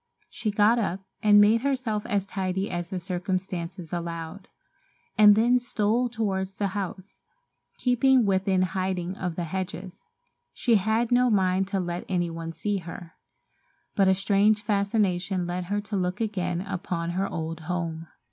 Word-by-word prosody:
She 215 - -3
got 210 +3 +4
up 195 -3 -2 0.2
and 205 -1 +6
made 215 +2 +5
herself 255 -6 -1
as 200 -2 0
tidy 190 0 -2
as 175 -1 -3
the 190 - -3
circumstances 180 -1 -4
allowed, 170 +2 -5 0.7
and 210 -1 +8
then 240 +3 +4
stole 240 +1 0
toward 200 -5 -1
the 195 +1 -3
house, 190 0 -6 0.6
keeping 255 0 +3
within 190 -1 +2
hiding 185 0 -2
of 180 -3 -4
the 175 - -2
hedges. 185 +2 -5 0.5
She 235 -3 +3
had 220 +4 0
no 250 0 +4
mind 190 -2 +2
to 195 0 -1
let 175 -1 -3
any 175 -2 0
one 165 0 -5
see 205 +4 -2
her, 170 -1 -9 0.8
but 195 -2 +4
a 190 - +5
strange 205 +2 +2
fascination 200 -3 0
led 175 +1 -3
her 205 +3 -1
to 205 0 -5
look 180 -1 -1
again 180 -6 -1
upon 180 -3 -3
her 190 +3 -1
old 165 -1 -4
home. 165 -1 -4
190 Hz, 155 wpm, -26 LUFS, 180-210 Hz, 0.8 s, and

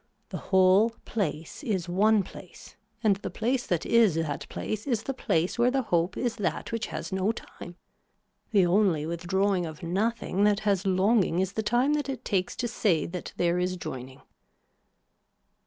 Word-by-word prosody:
The - - -5
whole 190 +3 +5 0.2
place 165 -8 -3
is 200 - -2
one 205 +4 +3
place 180 -1 -13 0.3
and 205 -3 +3
the 205 - -5
place 245 +3 -1
that 175 -3 0
is 225 -7 +4
that 160 -3 -3
place 215 +4 -4
is 235 -5 0
the 270 - -3
place 175 -5 -1
where 240 +1 +5
the 265 +1 0
hope 175 -3 0
is 240 -1 -1
that 205 +1 -2
which 230 -1 -2
has - - -6
no 190 +3 +1
time. 175 -5 -10 0.7
The 200 -5 +4
only 175 -4 +2
withdrawing 175 +2 0
of 155 +2 -10
nothing 200 +2 0
that 210 0 +2
has 200 -2 +1
longing 190 -1 +2
is 190 +1 0
the 220 - -1
time 245 +6 +2
that 295 -2 -1
it 260 -2 -5
takes 185 -2 -1
to 245 - -2
say 205 -8 +1
that 180 0 -6
there 175 0 +1
is 180 0 -1
joining. 130 -5 -8
195 Hz, 170 wpm, -27 LUFS, 175-225 Hz, 0.7 s, whole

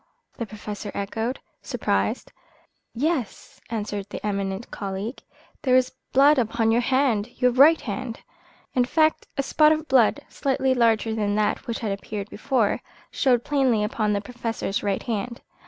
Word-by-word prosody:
the 230 - -4
Professor 210 -1 -7
echoed, 225 +5 -2 0.2
surprised. - - -1 0.6
"Yes," 280 - -2
answered 205 -3 -3
the - - -6
eminent 200 +1 -3
colleague, 200 +4 -5 0.4
"there 255 -2 +3
is 255 0 +3 0.2
blood 280 +2 +6
upon 225 -1 +1
your 235 +2 +3
hand 250 -4 +1
your 250 -1 +4
right 285 +6 +6
hand." 235 +1 -5 0.5
In 250 - +3
fact 310 +4 +2
a 275 - +1
spot 305 +2 +4
of 310 0 0
blood, 260 +2 +4
slightly 265 -1 0
larger 225 -2 +2
than 205 -2 0
that 210 0 0
which 235 - -2
had 215 -3 -1
appeared 200 +1 -5
before, 235 -2 0 0.3
showed 245 -3 +2
plainly 260 -7 +2
upon 210 0 0
the 200 - 0
Professor's 230 -3 -3
right 200 -2 -1
hand. 235 0 -3
230 Hz, 150 wpm, -24 LUFS, 210-260 Hz, 0.6 s, blood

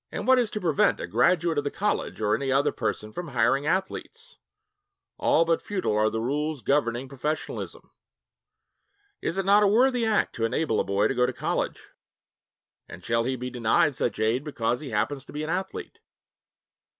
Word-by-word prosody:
And - - -4
what 260 0 +5
is 235 -3 +1
to 210 - -4
prevent 165 -7 +2
a - - -3
graduate 160 - +2
of - - -3
the 145 - -1
college 205 - -2
or 105 -1 +2
any 135 +3 0
other 140 +2 +3
person 110 -2 -3
from 175 +6 -5
hiring 140 +1 +1
athletes? 450 - -3 0.8
All 165 - +3
but 165 0 +1
futile 190 - -2
are 110 +1 +3
the 110 - -3
rules 145 +3 -2
governing 130 -3 0
professionalism. 145 +3 -5 1.3
Is 170 - -2
it 195 - 0
not 200 +2 +6
a 205 - +5
worthy 245 +4 +3
act 220 -1 +1
to 115 - +1
enable 115 0 0
a - - +2
boy 100 +2 +1
to - - -1
go 125 -1 +2
to - - -3
college? - - -3 1.0
And - - -11
shall 115 0 +1
he 130 +1 -1
be 125 0 -5
denied 120 +4 +2
such 120 - -2
aid 110 +5 +1
because 120 -5 -1
he 145 - -7
happens 135 +5 -1
to - - -13
be 150 +1 -3
an 155 - -3
athlete? 190 +2 -4
145 Hz, 185 wpm, -26 LUFS, 120-180 Hz, 1.3 s, not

